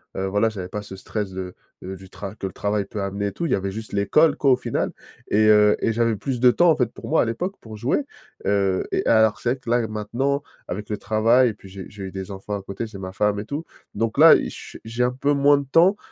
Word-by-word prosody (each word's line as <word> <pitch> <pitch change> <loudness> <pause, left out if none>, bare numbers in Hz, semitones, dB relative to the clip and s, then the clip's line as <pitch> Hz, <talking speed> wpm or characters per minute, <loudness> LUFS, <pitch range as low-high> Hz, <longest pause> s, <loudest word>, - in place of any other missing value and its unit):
heu, 95 0 -2
voilà, 105 +3 +2
j'avais 95 -5 -5
pas 105 - -4
ce 100 -2 -10
stress 100 +1 -4
de, 95 -1 -6 0.3
heu, 95 +1 -6
du 95 0 -14
tra 100 +1 -8
que 95 - -4
le 95 - -9
travail 105 0 -1
peut 100 +1 -6
amener, 100 +1 -2
et - - -3
tout. 170 - -3
Il - - -3
y - - +4
avait 95 0 -3
juste 110 +2 -7
l'école, 125 +11 +3
quoi, 140 - +3
au - - +6
final. 125 - -2 0.4
Et 110 +1 +3
heu, 105 -1 +6
et - - +2
j'avais 115 0 +1
plus 125 +5 -3
de 125 0 +6
temps, 175 +7 +4
en 160 - +5
fait, 125 -5 0
pour - - -9
moi, 160 - +3
à - - +2
l'époque, 145 - -3
pour 110 -1 -10
jouer. 125 - 0 0.4
Heu, 100 -2 +1
et - - 0
alors, 110 -1 +4
c'est 120 - 0
vrai 130 - 0
que 120 - -9
là, 120 -1 +2
maintenant, 120 +7 -1 0.3
avec 105 +3 -5
le 105 - -1
travail 115 +5 +3
et - - -4
puis, 100 - -15
j'ai 95 0 -9
eu - - -7
j'ai 100 -1 -9
eu 95 - -6
des 95 0 -6
enfants 100 +1 -5
à - - -7
côté, 100 +4 -5
j'ai 110 - -10
ma 95 -1 -6
femme, 105 +1 0
et - - -9
tout. 145 +7 -5 0.3
Donc 115 +1 -2
là, 160 +3 +9
i - - -1
je - - -10
s - - -22
j'ai 115 +2 -1
un 125 - +2
peu 140 +3 0
moins 145 0 +5
de 140 - -4
temps 170 +9 +4
110 Hz, 285 wpm, -23 LUFS, 100-125 Hz, 0.4 s, là